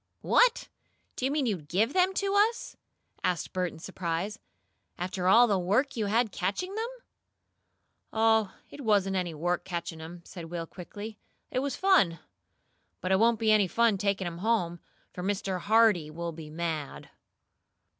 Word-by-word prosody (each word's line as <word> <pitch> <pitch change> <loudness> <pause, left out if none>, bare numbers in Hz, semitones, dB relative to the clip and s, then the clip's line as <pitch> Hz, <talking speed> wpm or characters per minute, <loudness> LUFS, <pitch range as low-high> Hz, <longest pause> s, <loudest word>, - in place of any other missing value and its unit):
"What! - - +3 0.5
Do 255 - -2
you 270 - +1
mean 290 -2 +1
to 215 -5 0
GIVE 195 - 0
them 375 +1 +3
to 395 0 0
us?" 430 +3 +2 0.5
asked 175 -3 -1
Bert 180 -2 -1
in - - -12
surprise. 185 +3 -4 0.6
"After 180 +1 -2
all 230 +6 +7
the 205 -5 +1
work 215 +10 +1
you 220 -3 -1
had 225 +1 +2
catching 200 - -2
them?" 445 +2 -2 1.2
"Oh, 220 -2 +3 0.2
it 285 - -9
wasn't 200 -5 +2
any 175 -3 -2
work 175 +3 -1
catching 170 -3 -5
'em," 170 +2 -9
said 175 -3 -8
Will 165 0 -5
quickly. 205 +5 -9 0.3
"It 255 - 0
was 280 +1 -2
fun. 285 - +3 0.8
But 185 - -3
it 190 - +4
won't 230 +1 +4
be 220 -1 +3
any 210 -3 +5
fun 225 0 +2
taking 200 -1 0
'em 170 -1 -5
home, 180 -5 0 0.3
for 180 - -6
Mr. 190 -1 -1
Hardee 210 -5 +4
will 170 +2 -4
be 155 -1 -9
mad." 155 -2 -4
195 Hz, 165 wpm, -29 LUFS, 175-230 Hz, 1.2 s, all